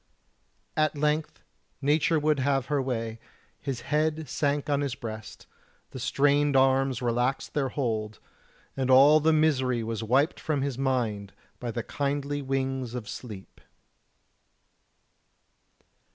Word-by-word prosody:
At 155 -1 +1
length 150 +1 -1 0.4
Nature 150 +3 +2
would 150 -1 +1
have 135 -1 +1
her 145 -1 0
way 115 -3 -3 0.4
his 130 -4 -4
head 155 +1 0
sank 145 +2 -1
on 145 -1 +1
his 140 -4 -2
breast, 110 -2 -8 0.5
the 130 - -7
strained 145 +2 +2
arms 130 -1 +3
relaxed 125 +3 0
their 140 -3 0
hold, 110 -6 -2 0.6
and 130 -1 -1
all 140 +4 +7
the 160 +1 +3
misery 130 -6 +2
was 115 0 -3
wiped 130 +8 +2
from 145 -4 -1
his 140 -2 -2
mind 115 -7 -1 0.3
by 120 - -4
the 115 0 -3
kindly 145 0 -2
wings 135 -2 -2
of 120 -4 -5
sleep. 105 -6 -9
135 Hz, 125 wpm, -27 LUFS, 120-145 Hz, 0.6 s, all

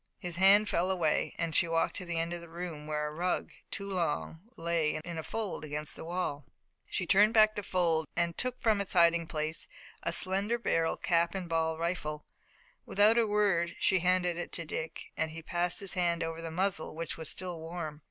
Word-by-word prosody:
His 175 -3 -3
hand 200 +3 +6
fell 180 0 +1
away 170 -5 +1
and 165 -1 -2
she 170 - +3
walked 165 0 +1
to 185 - -5
the 170 -1 -3
end 165 +1 -1
of 175 - -5
the 170 - -11
room 165 -3 -6
where 150 0 -1
a 150 - -3
rug, 175 +3 -1 0.2
too 200 - -4
long, 165 - -2 0.2
lay 165 -2 0
in 170 -1 -4
a - - -4
fold 215 -5 -3
against 150 0 -4
the - - -6
wall. 165 -4 -3 0.5
She - - -1
turned 210 +4 +5
back 215 -1 +6
the 205 - -2
fold 170 -5 +1
and 170 -1 +1
took 255 0 -1
from 215 -3 +2
its 200 - -2
hiding 170 -1 +4
place 155 0 -3 0.3
a - - -1
slender 195 +6 +1
barreled 165 -8 0
cap 170 +1 +2
and 185 -2 -3
ball 160 -1 0
rifle. 160 -3 -3 0.6
Without 215 +3 +4
a 230 - +3
word 200 -5 +2
she 190 - +3
handed 180 -1 +2
it 175 - -4
to - - -3
Dick - - -5
and 160 - 0
he 165 +1 -8
passed 175 +2 0
his 195 -2 -1
hand 175 -2 +1
over 165 0 -4
the 165 - -5
muzzle, 175 -1 -1
which 165 +1 -4
was 160 -2 -4
still 180 -3 -4
warm. 160 -2 -6
170 Hz, 210 wpm, -31 LUFS, 165-190 Hz, 0.6 s, hand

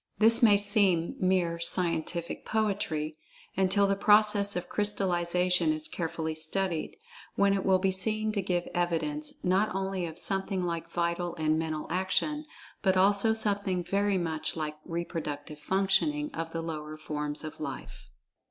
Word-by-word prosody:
This 225 +3 +6
may 210 -4 +6
seem 200 -5 +3
mere 180 -3 +1
"scientific 170 -1 +2
poetry" 195 -8 -1 0.4
until 195 +1 +3
the 195 0 +1
process 205 0 +4
of 180 0 -3
crystallization 180 -4 +1
is 155 0 -3
carefully 160 -2 -3
studied, 160 +2 -3 0.4
when 200 0 +3
it 195 -1 -1
will 190 -1 +4
be 190 +1 +1
seen 215 +3 0
to 205 -2 -1
give 175 -2 -2
evidence, 155 -4 -2
not 190 +2 +1
only 190 -2 -2
of 160 0 -9
something 195 0 0
like 170 -1 -4
vital 170 0 -2
and 155 -1 0
mental 155 -1 -3
action, 245 - -1 0.4
but 190 -2 +2
also 200 +3 +3
something 200 -4 0
very 200 +2 0
much 160 -3 -2
like 155 -1 -4
reproductive 155 -3 -5
functioning 195 - 0
of 165 0 -5
the 165 0 -4
lower 155 -1 -6
forms 150 -1 -4
of 155 - -8
"life." 140 -3 -8
180 Hz, 145 wpm, -29 LUFS, 165-200 Hz, 0.4 s, This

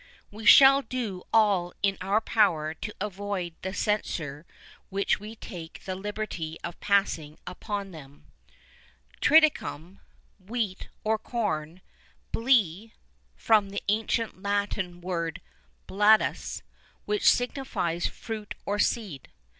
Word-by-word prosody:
We 215 +2 -6
shall 275 0 +9
do 225 -8 -5
all 200 -5 +3
in 195 -1 +2
our 200 +4 +1
power 165 -9 +2
to 210 +5 -7
avoid 200 -3 -3
the 190 - -4
censure 165 -8 -2 0.4
which 200 +1 0
we 215 +2 -9
take 170 -7 -9
the 190 - -3
liberty 190 -5 -5
of - - -6
passing 180 -7 0
upon 200 +2 -5
them. 145 -4 -13 1.0
"Triticum," 275 - +3 0.4
wheat, 210 -2 -3
or 220 0 +1
corn; 185 -8 -3 0.5
"Blé," 225 -4 +2 0.4
from 215 -3 +3
the 200 - -5
ancient 220 -1 0
Latin 200 -3 -2
word 170 -2 -3 0.5
"Bladus," 210 +2 +2 0.4
which 420 -1 +3
signifies 245 - 0
fruit 215 -2 -7
or 205 +1 -1
seed. 200 - -1
200 Hz, 110 wpm, -27 LUFS, 175-220 Hz, 1.0 s, shall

